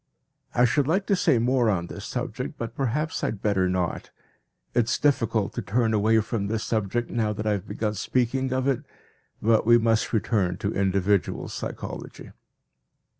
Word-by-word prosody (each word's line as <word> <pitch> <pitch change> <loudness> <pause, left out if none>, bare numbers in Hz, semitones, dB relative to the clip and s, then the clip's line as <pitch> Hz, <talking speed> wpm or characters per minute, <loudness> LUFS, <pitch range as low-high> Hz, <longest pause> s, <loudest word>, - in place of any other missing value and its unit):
I 125 - +5
should 130 +3 +2
like 190 +5 +1
to 200 - +2
say 180 -8 +3
more 120 0 +2
on 90 -5 0
this - - -8
subject, - - -4
but 115 - -5
perhaps 140 +4 -2
I - - +2
had 105 - -4
better 95 -3 +2
not. 90 -2 -2 0.6
It 120 - +3
is - - +1
difficult 115 -7 +1
to - - -3
turn 110 +4 +1
away 110 +1 +4
from 110 -2 -2
this 110 +1 -2
subject 115 +2 -1
now 110 -2 0
that 105 +1 -5
I 105 - +2
have 100 -3 -2
begun 105 -1 -2
speaking 130 +5 0
of 130 +1 0
it, 135 0 +1 0.6
but 110 0 +4
we 120 +1 +6
must 115 -1 +1
return 100 -5 +1
to 100 +3 -2
individual 100 0 +1
psychology. - - -7
110 Hz, 175 wpm, -25 LUFS, 100-125 Hz, 0.6 s, we